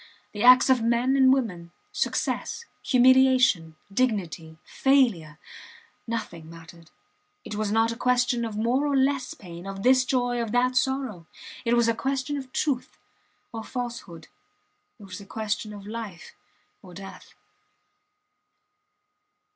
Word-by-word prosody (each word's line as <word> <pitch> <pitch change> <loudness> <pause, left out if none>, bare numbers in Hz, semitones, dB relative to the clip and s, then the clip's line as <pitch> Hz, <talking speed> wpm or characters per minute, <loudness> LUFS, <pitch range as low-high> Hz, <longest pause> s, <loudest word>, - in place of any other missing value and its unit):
The 210 - -6
acts 255 +1 +7
of 260 -3 +3
men 235 +3 +1
and 265 -1 +5
women, 190 -11 -1 0.2
success, 470 - -2 0.2
humiliation, 255 - +4 0.2
dignity, 180 -9 -2
failure 230 - +1 0.7
nothing 210 -9 -5
mattered. 165 0 -14 0.6
It - - -7
was 210 -1 -2
not 225 +1 +2
a - - -5
question 245 0 +1
of 220 -2 -4
more 245 +6 +1
or 280 -1 +1
less 265 -1 0
pain, 175 -1 -11
of 195 0 -6
this 255 0 +5
joy, 245 -1 0
of 230 -2 -4
that 250 +1 +2
sorrow. 260 -10 -1 0.4
It 235 +1 +2
was 235 -1 +3
a 230 - +3
question 270 +3 -2
of 265 -2 -7
truth 270 -3 -2 0.6
or 225 -1 -5
falsehood 235 -10 -7 0.7
it - - -13
was 190 0 -9
a - - -12
question 215 0 -3
of 205 -1 -10
life 215 -5 -8 0.5
or 180 -3 -14
death. 195 +1 -11
230 Hz, 135 wpm, -25 LUFS, 195-255 Hz, 0.7 s, acts